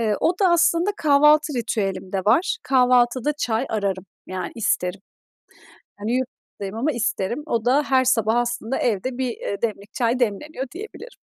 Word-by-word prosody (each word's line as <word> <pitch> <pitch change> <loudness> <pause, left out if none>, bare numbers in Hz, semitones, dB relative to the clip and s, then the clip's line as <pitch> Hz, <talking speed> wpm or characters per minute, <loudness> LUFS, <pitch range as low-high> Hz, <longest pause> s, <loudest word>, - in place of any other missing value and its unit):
Eee, 215 -2 +1
o 360 +2 +1
da 380 - +5
aslında 345 +2 +3
kahvaltı 300 0 +4
ritüelimde 195 -5 -2
var, 365 - +3
kahvaltıda 250 +1 +3
çay 245 -4 -1
ararım, 195 -3 -2 0.2
yani, 185 0 -5
isterim. 190 -4 -1 1.0
Hani, 215 +3 -2
yurt 260 -1 -2 0.3
dayım 195 +1 -5
ama 265 +7 0
isterim. 235 +1 -2
O 230 -6 -1
da 275 +4 +3
her 260 -2 +2
sabah 225 -3 +2
aslında 240 0 -1
evde 245 +3 -1
bir, 260 -1 -1
eee, 200 - -5
demlik 210 -2 -3
çay 240 0 0
demleniyor 255 +5 -2
diyebilirim. 440 +5 -10
240 Hz, 155 wpm, -22 LUFS, 215-285 Hz, 1.0 s, da